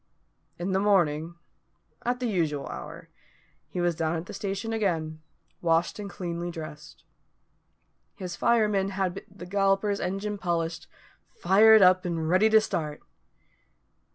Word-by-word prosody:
In 175 +3 -3
the 190 - +2
morning, 170 -5 +2 0.7
at 245 +1 -1
the 250 - -2
usual 165 -10 -1
hour, 65 -4 -8 0.6
he - - -5
was 175 -1 +2
down 160 0 -1
at 165 +1 -4
the - - -9
station 200 +2 -3
again, 160 -7 -1 0.4
washed 165 +3 +1
and 205 -1 -5
cleanly 175 -2 -4
dressed. 155 -2 -9 1.1
His 180 -5 -6
fireman 210 -4 +2
had 190 -1 -2
the 190 -2 -11
Galloper's 195 +2 +1
engine 195 +3 -3
polished, 170 -2 -2 0.5
fired 220 - +6
up, 185 0 +5
and 165 -3 -2
ready 185 +6 +4
to 220 0 +7
start. 155 -8 -3
185 Hz, 130 wpm, -27 LUFS, 165-200 Hz, 1.1 s, to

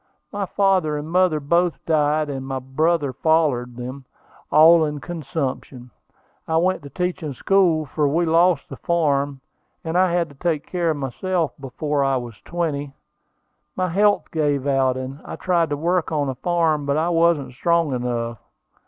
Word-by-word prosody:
My 200 -2 -3
father 185 -6 +1
and 150 +2 -6
mother 180 -3 +3
both 170 +4 +1
died, 155 -1 +2
and 135 -2 -4
my 135 0 -4
brother 145 +2 0
followed 135 -5 +1
them, 130 +2 -7 0.5
all 160 +2 +7
in 150 -1 -2
consumption. 140 -6 -5 0.6
I 160 - +1
went 185 +3 +1
to 140 - -10
teaching 180 -1 -3
school, 175 -2 +2
for 150 +1 0
we 165 +5 +1
lost 165 -1 +3
the 135 - -9
farm, 145 -5 0 0.4
and 160 +1 -4
I 185 0 +3
had 170 -1 +1
to 145 - -16
take 160 0 -1
care 175 -2 -1
of 155 - 0
myself 165 +5 -2
before 145 +2 -2
I 135 -1 +1
was 120 -4 -8
twenty. 145 -5 -3 0.8
My 185 0 -1
health 205 +4 +2
gave 145 -4 0
out, 135 -2 +2
and 130 +2 -6
I - - -7
tried 170 -3 +1
to 145 - -2
work 170 +2 0
on 145 -3 0
a - - -2
farm, 160 0 0
but 140 +1 +1
I 165 +2 +1
wasn't 165 -5 +2
strong 170 +2 +1
enough. 120 -2 -3
155 Hz, 170 wpm, -22 LUFS, 140-170 Hz, 0.8 s, all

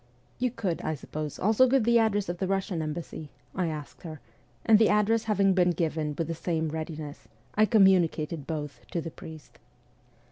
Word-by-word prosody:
' - - -35
You 250 0 +1
could, 195 -8 -3
I 155 - -2
suppose, 150 +1 -6
also 220 +6 +4
give 265 -2 +3
the 235 +1 +4
address 205 -3 +1
of 175 0 -4
the 190 - -1
Russian 195 -3 -1
embassy? 155 -1 -5
' - - -36
I 185 -2 0
asked 150 -3 -6
her, 160 -3 -8 0.5
and 220 -2 +6
the 220 - +5
address 215 +2 +2
having 200 -3 +3
been 180 -1 +3
given 155 -2 -2
with 165 - 0
the 165 - -2
same 160 -1 -2
readiness, 155 -1 -6 0.3
I 215 +1 +4
com 205 -1 +6
municated 165 -5 +1
both 150 -3 -4
to 170 - 0
the 165 0 -5
priest. 155 -1 -12
175 Hz, 200 wpm, -28 LUFS, 155-210 Hz, 0.5 s, and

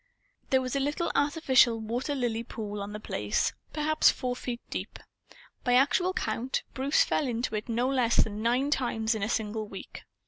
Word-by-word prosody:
There 260 -1 +3
was 255 +1 -3
a - - +2
little 290 +5 -1
artificial 265 -5 +4
water 240 +6 -2
lily 240 -4 -1
pool 210 -3 -6
on 200 +1 -5
The 210 - -6
Place, 105 - -1 0.2
perhaps 310 +1 +3
four 250 -1 -1
feet 245 -1 -4
deep. - - -5 0.7
By 245 - +2
actual 295 +8 +3
count, 260 -8 -2
Bruce 275 +3 +3
fell 290 - 0
into 235 -1 -2
it 215 +2 -3
no 235 +2 +1
less 250 -3 +2
than 210 0 +1
nine 250 +5 +1
times 235 -5 +1
in 220 - -4
a 210 - -1
single 215 -1 -2
week. 195 - -9
245 Hz, 180 wpm, -29 LUFS, 220-270 Hz, 0.7 s, artificial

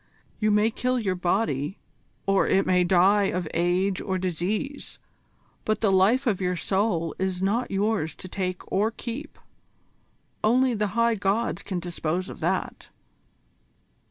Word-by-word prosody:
You 215 -1 +2
may 210 +2 +3
kill 250 +3 0
your 205 -6 0
body, 175 - -1 0.5
or 195 0 +3
it 195 - +3
may 180 -1 +3
die 190 +3 +4
of 180 -3 -1
age 180 +3 +1
or 190 -2 -2
disease, 190 - -3 0.7
but 215 - -1
the 210 -3 +3
life 205 +8 +4
of 205 -6 0
your 180 0 0
soul 180 -3 0
is 190 -1 -1
not 210 +6 0
yours 200 -4 0
to - - -9
take 185 -1 -3
or 205 +3 +2
keep. 240 +6 -7 1.1
Only 250 +3 +3
the 210 -1 -2
High 230 0 +4
Gods 205 +3 0
can 185 -4 -3
dispose 175 +1 -3
of - - -10
that. - - -2
195 Hz, 145 wpm, -26 LUFS, 180-220 Hz, 1.1 s, die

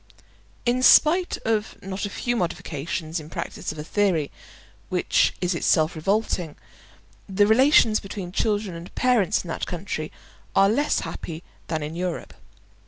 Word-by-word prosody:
In 245 +1 +2
spite 345 +7 +5
of 220 -1 -1
not 195 +2 -3
a - - -7
few 240 +4 -2
modifications 165 -3 -3
in 155 0 -10
practice - - -5
of 155 - -10
a 150 - -5
theory 175 -4 0 0.6
which - - +2
is 180 0 +1
itself 160 -1 +2
revolting, 180 -2 -1 0.7
the 200 +2 +3
relations 225 -1 +5
between 195 -2 -7
children 205 -2 -1
and 170 +2 -10
parents 245 -7 +2
in - - -11
that - - -3
country 170 -3 -4 0.4
are 195 0 +5
less 285 +8 +1
happy 165 +1 -7 0.2
than 160 -2 -2
in 155 +2 -5
Europe. 180 0 -4
190 Hz, 145 wpm, -24 LUFS, 165-215 Hz, 0.7 s, spite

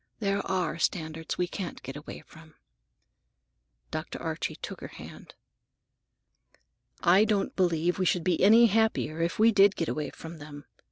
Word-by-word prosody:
There 200 -2 -1
are 180 -3 -1
standards 160 -2 -2
we 180 - +1
can't 180 0 -6
get 135 +1 -7
away 150 +1 -9
from." 160 -1 -17 1.4
Dr. - - -5
Archie - - -3
took - - -8
her - - -6
hand. - - -12 1.7
"I 185 +4 +6
don't 210 -2 0
believe 175 0 +1
we 185 - +1
should 175 - +1
be 180 -3 +1
any 225 +5 +7
happier 220 -7 +1
if 170 +1 -1
we 225 +2 +5
did 200 -1 +5
get 165 - -2
away 150 -2 -3
from 165 0 -10
them. 145 -1 -10
175 Hz, 155 wpm, -28 LUFS, 160-200 Hz, 1.7 s, any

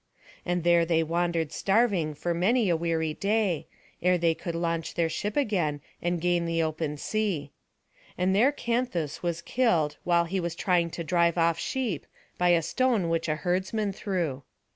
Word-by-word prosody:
And 175 -1 0
there 170 0 +5
they 165 -1 +2
wandered 165 -1 0
starving 195 -8 +1
for 170 +4 -2
many 205 +5 +2
a - - +3
weary 160 -1 -1
day, 200 -3 0 0.3
ere 180 +1 +3
they 170 -1 +2
could 170 +1 -5
launch 165 -1 -2
their 165 -1 +1
ship 205 - -3
again, 180 - +1 0.2
and 175 0 0
gain 175 0 +1
the 165 0 +1
open 155 -1 -2
sea. 180 -6 -2 0.7
And 185 +1 +2
there 245 +8 +5
Canthus 235 - -2
was 170 -1 -2
killed 175 -12 +1
while 170 -1 +3
he 190 +3 -2
was 170 -1 -3
trying 175 -2 +1
to 170 - -5
drive 170 0 +2
off 165 -1 +2
sheep, 235 - -2 0.3
by 180 0 +3
a 170 -2 +4
stone 235 - +1
which 165 0 0
a 155 - +1
herdsman 190 +5 -1
threw. 175 -10 -2
170 Hz, 170 wpm, -27 LUFS, 165-195 Hz, 0.7 s, there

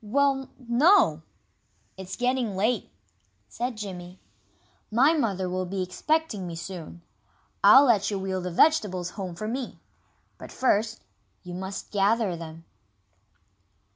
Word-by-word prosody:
"Well 270 +4 +1
no! 250 - +4 0.7
It's 190 0 -7
getting 245 -4 0
late," 215 +3 0 0.6
said 240 - -4
Jimmy. 185 -3 -7 0.7
"My 260 +8 +4
mother 200 - 0
will 185 0 -2
be 190 0 -2
expecting 220 - -1
me 170 - -6
soon. 170 0 -8 0.6
I'll 275 +2 +9
let 225 -6 +3
you 205 - -2
wheel 190 -1 -3
the 180 - -4
vegetables 185 - +2
home 185 -3 -6
for 215 +5 -5
me. 250 +2 -4 0.6
But - - -10
first, 225 -3 0 0.4
you 180 - -8
must 190 +2 -6
gather 205 -1 +2
them." 165 0 -9
200 Hz, 125 wpm, -26 LUFS, 180-245 Hz, 0.7 s, I'll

